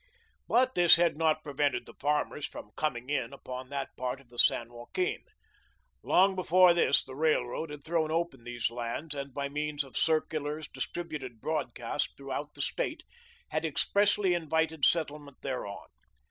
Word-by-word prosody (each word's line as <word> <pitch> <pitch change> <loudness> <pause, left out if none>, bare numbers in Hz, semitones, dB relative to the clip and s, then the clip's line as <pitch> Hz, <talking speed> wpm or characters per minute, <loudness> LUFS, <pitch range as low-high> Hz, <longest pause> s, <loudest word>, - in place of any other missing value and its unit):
But 255 +2 +3
this 175 -1 +8
had 170 -2 +2
not 155 0 +2
prevented 145 -1 0
the - - -13
farmers 150 0 -1
from - - -10
"coming 125 -5 -2
in" 125 -5 -1
upon 130 0 -7
that 140 -1 -4
part 125 +1 -3
of 135 -3 -20
the 120 0 -10
San 120 0 +4
Joaquin. 365 - -2 0.8
Long 190 +1 +4
before 185 -1 +6
this 170 -4 +4
the 130 - -10
railroad 155 0 0
had 145 -1 -8
thrown 160 -1 0
open 165 -6 -1
these 120 -1 -2
lands, 120 +6 -4
and, 140 -1 -5
by 140 +2 -2
means 150 0 -2
of 135 - -15
circulars, 155 -1 0
distributed 150 -9 -5
broadcast 145 -3 -2
throughout 140 +1 -5
the - - -1
State, - - -2 0.5
had 155 - -1
expressly 200 +5 +2
invited 160 -2 +1
settlement 150 -4 0
thereon. 125 -7 -4
150 Hz, 155 wpm, -30 LUFS, 130-165 Hz, 0.8 s, this